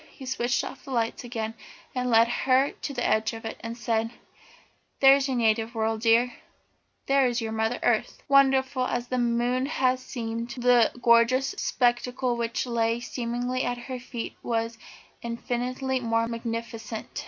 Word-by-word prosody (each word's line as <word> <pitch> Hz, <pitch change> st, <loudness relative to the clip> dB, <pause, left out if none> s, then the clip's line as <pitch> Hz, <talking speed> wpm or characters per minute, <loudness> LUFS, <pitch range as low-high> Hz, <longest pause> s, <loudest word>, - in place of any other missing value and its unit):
He 270 Hz, -, -12 dB
switched 245 Hz, -2 st, 0 dB
off -, -, -8 dB
the -, -, -12 dB
lights 235 Hz, -2 st, -1 dB
again 225 Hz, -2 st, -4 dB, 0.4 s
and 250 Hz, -1 st, -1 dB
led 230 Hz, 0 st, +5 dB
her 260 Hz, +3 st, +2 dB
to -, -, -6 dB
the 245 Hz, -3 st, -2 dB
edge 220 Hz, +1 st, +1 dB
of 225 Hz, 0 st, -8 dB
it, 225 Hz, -, -5 dB
and 230 Hz, +1 st, -5 dB
said: 225 Hz, -2 st, 0 dB, 0.9 s
"There 270 Hz, 0 st, +8 dB
is 280 Hz, 0 st, 0 dB
your 260 Hz, -2 st, -1 dB
native 225 Hz, 0 st, +1 dB
world, 220 Hz, 0 st, -1 dB
dear. 235 Hz, +2 st, +3 dB, 0.7 s
That 275 Hz, -1 st, +3 dB
is 245 Hz, 0 st, +1 dB
your 225 Hz, -2 st, -3 dB
Mother 220 Hz, +2 st, 0 dB
Earth." -, -, 0 dB
Wonderful 265 Hz, -1 st, +3 dB
as 240 Hz, -1 st, -3 dB
the 255 Hz, -, 0 dB
moon 240 Hz, +2 st, +1 dB
had 255 Hz, -3 st, +1 dB
seemed, 230 Hz, -2 st, -5 dB
the 245 Hz, -2 st, +4 dB
gorgeous 235 Hz, +3 st, +4 dB
spectacle 245 Hz, 0 st, 0 dB
which 235 Hz, +1 st, -2 dB
lay 230 Hz, -1 st, 0 dB
seemingly 245 Hz, +1 st, -3 dB
at 245 Hz, 0 st, -1 dB
her 250 Hz, +1 st, -6 dB
feet 240 Hz, -1 st, -6 dB
was 230 Hz, -1 st, -2 dB, 0.4 s
infinitely 250 Hz, +3 st, -2 dB
more 230 Hz, -1 st, 0 dB
magnificent. 230 Hz, -1 st, -5 dB
240 Hz, 160 wpm, -26 LUFS, 230-255 Hz, 0.9 s, There